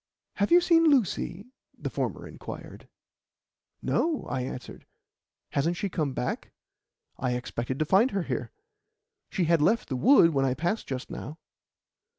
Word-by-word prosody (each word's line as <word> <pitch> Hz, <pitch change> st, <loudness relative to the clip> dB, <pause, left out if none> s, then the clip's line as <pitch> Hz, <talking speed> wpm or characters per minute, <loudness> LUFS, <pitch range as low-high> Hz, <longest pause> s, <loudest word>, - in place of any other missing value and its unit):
"Have 200 Hz, 0 st, +1 dB
you 350 Hz, -, +8 dB
seen 335 Hz, -1 st, +4 dB
Lucy?" 205 Hz, -, +1 dB, 0.3 s
the -, -, -4 dB
former -, -, -3 dB
inquired. -, -, -9 dB, 1.0 s
"No," 320 Hz, -3 st, 0 dB
I 130 Hz, -, -2 dB
answered. 125 Hz, 0 st, -7 dB, 0.6 s
"Hasn't 165 Hz, +5 st, 0 dB
she 200 Hz, 0 st, -2 dB
come 150 Hz, -6 st, -1 dB
back? 125 Hz, -, -3 dB, 0.7 s
I 125 Hz, -1 st, 0 dB
expected 125 Hz, +1 st, -3 dB
to 155 Hz, -, +1 dB
find 195 Hz, -, +4 dB
her 195 Hz, -5 st, -1 dB
here. 125 Hz, -5 st, -3 dB, 0.8 s
She 185 Hz, -, 0 dB
had 165 Hz, -1 st, +3 dB
left 215 Hz, +9 st, +2 dB
the 135 Hz, -, -1 dB
wood 190 Hz, -, +6 dB
when 135 Hz, -3 st, +1 dB
I 130 Hz, -1 st, +1 dB
passed 175 Hz, +9 st, -1 dB
just 130 Hz, -2 st, -5 dB
now." 150 Hz, +4 st, -7 dB
165 Hz, 150 wpm, -28 LUFS, 130-210 Hz, 1.0 s, you